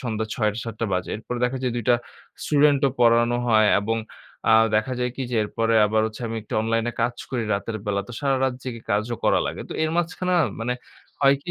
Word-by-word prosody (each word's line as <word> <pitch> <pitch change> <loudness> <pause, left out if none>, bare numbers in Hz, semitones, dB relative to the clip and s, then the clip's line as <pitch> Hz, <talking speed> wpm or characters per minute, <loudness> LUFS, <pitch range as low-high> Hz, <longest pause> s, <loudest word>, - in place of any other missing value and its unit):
সন্ধ্যা 110 -4 -2
৬ঃ০০-৭ঃ০০ 110 0 -2
বাজে। 90 0 -1
এরপরে 120 +2 -5
দেখা 125 +2 0
যায় 125 -2 0
২ 120 - -2
টা - - +7 0.5
স্টুডেন্টও 145 -2 +4
পড়ানো 120 0 +4
হয় 110 -2 +5
এবং 115 +3 -1 0.5
আ - - +7 0.2
দেখা 110 +4 +1
যায় 125 0 0
কি? 135 - -3
যে 120 - -2
এরপরে 115 +2 0
আবার 110 +1 +1
হচ্ছে 110 +2 -8
আমি 115 0 -4
একটু - - -7
অনলাইনে 115 +1 0
কাজ 120 +1 0
করি 125 -3 -1
রাতের 110 +2 -3
বেলা। 100 -1 0
তো - - -8
সারারাত 135 -2 +1
জেগে 120 -3 -6
কাজও 110 +3 0
করা - - +4
লাগে। - - -4
তো - - -5
এর 160 - +1
মাঝখানে 180 +2 -1
না - - +4 0.2
মানে 125 +2 -1 0.5
হয় 140 0 +6
কি? - - -6
115 Hz, 210 wpm, -24 LUFS, 110-130 Hz, 0.5 s, টা